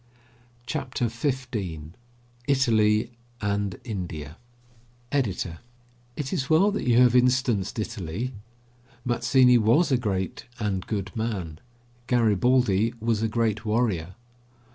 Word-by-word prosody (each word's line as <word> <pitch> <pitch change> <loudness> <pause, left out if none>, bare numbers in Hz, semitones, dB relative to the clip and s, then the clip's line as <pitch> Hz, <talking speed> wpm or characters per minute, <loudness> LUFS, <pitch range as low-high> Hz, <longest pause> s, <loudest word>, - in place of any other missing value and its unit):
CHAPTER 125 -3 -2
XV 130 +3 -2 1.0
ITALY 115 -5 +3 0.3
AND 100 -2 -2
INDIA 85 - -6 0.7
EDITOR: 95 -11 -1 0.6
It 140 -3 -4
is 135 - -2
well 185 +7 +5
that 205 - -3
you 120 - +4
have 125 -1 +5
instanced 125 -6 +2
Italy. 110 +2 -4 0.7
Mazzini 125 0 +4
was 120 +10 +3
a 130 - +4
great 95 -6 -3
and 100 -4 -2
good 100 -2 -3
man; 100 -9 -3 0.5
Garibaldi 115 -1 +2
was 115 -1 0
a 110 - +1
great 110 -1 0
warrior. 105 -6 0
115 Hz, 105 wpm, -26 LUFS, 100-125 Hz, 1.0 s, well